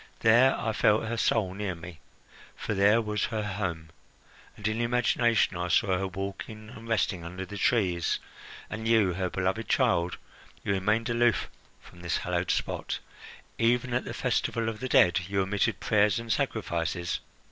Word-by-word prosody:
There 120 +4 +5
I 110 - -1
felt 105 0 +3
her 115 +1 -2
soul 110 -4 +1
near 100 -2 -3
me; 85 -1 -10 0.6
for - - -3
there 105 +3 +4
was 105 -2 -1
her 110 -2 -3
home, 90 -6 -4 0.7
and 105 - -2
in 110 +2 -1
imagination 120 -3 +2
I 90 0 -2
saw 95 +2 +3
her 95 - -1
walking 100 +3 -6
and 115 +1 -11
resting 100 -6 0
under 90 +3 -6
the 105 - -9
trees. 95 -10 +1 0.5
And 110 +1 -5
you 110 -5 +4
her 90 +1 -2
beloved 95 +5 -1
child 90 -9 +2 0.5
you 100 - 0
remained 105 +4 +1
aloof 120 -2 +2 0.3
from 90 - -16
this 85 -3 -1
hallowed - - -2
spot! - - -1 0.6
Even 120 +2 +2
at 125 - +1
the - - -5
festival 115 -1 0
of 110 -1 -6
the 130 - -4
dead 90 -6 +5
you 100 0 +1
omitted 105 +3 0
prayers 105 -1 +3
and 115 -1 -1
sacrifices?" 90 - -2
105 Hz, 165 wpm, -28 LUFS, 95-115 Hz, 0.7 s, There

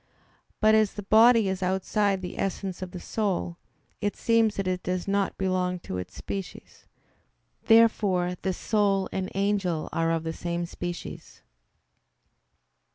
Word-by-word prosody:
But 215 0 +5
as 215 -2 +3
the 205 - -5
body 225 +1 +6
is 190 0 -2
outside 190 +1 0
the 180 - -6
essence 190 -1 -3
of 185 - -5
the 180 - -8
soul, 185 -4 -2 0.4
it 205 0 -1
seems 230 -2 +2
that 195 -1 -2
it 180 -1 -1
does 180 0 -3
not 200 0 0
belong 185 -1 0
to 90 - -5
its 90 - -8
species. 195 -2 -7 0.8
Therefore 205 -6 +4
the 190 - -1
soul 200 -1 +1
and 190 0 -3
angel 195 -5 0
are 165 0 +1
of 165 -1 0
the 160 0 -3
same 170 +1 -3
species. 175 0 -7
190 Hz, 145 wpm, -27 LUFS, 180-205 Hz, 0.8 s, body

